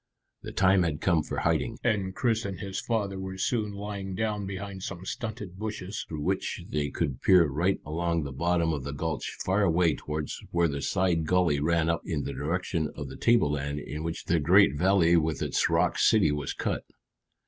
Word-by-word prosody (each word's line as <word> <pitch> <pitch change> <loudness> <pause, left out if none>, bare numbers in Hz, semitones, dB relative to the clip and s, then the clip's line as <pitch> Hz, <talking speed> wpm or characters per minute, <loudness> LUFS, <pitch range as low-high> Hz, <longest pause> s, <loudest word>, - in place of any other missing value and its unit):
The - - -7
time 95 0 +4
had 80 -4 0
come 85 -4 +2
for - - -4
hiding, - - 0
and 95 -2 0
Chris 115 -3 +1
and 95 -3 -5
his 95 -1 -4
father 100 -5 -1
were 95 0 -5
soon 105 +1 0
lying 100 -1 -5
down 105 -1 -1
behind 95 0 -6
some 95 -1 -6
stunted 105 -4 -5
bushes 105 -2 -4
through 80 -2 -5
which 95 +3 -1
they 75 -1 -1
could 70 -6 -2
peer 90 -3 +6
right 85 +7 0
along 85 +1 -1
the 70 - -5
bottom 85 +3 +1
of 70 -4 -3
the 70 +2 -5
gulch 75 -1 -3
far 95 +3 +2
away 85 -3 +3
towards 75 0 -5
where 85 0 +2
the 70 -2 -3
side 85 -2 +1
gully 90 -5 +3
ran 80 +2 +2
up 85 0 +1
in 80 -5 -2
the 70 - -4
direction 80 +3 -1
of 70 -2 -6
the 65 - -8
tableland 75 -11 +2
in 75 +1 -5
which 85 +1 -4
the 85 0 +2
great 90 +2 +5
valley 90 0 +4
with 80 -1 0
its - - +1
rock - - +2
city 100 -9 +4
was 75 -1 -2
cut. - - -2
85 Hz, 195 wpm, -28 LUFS, 75-95 Hz, -, peer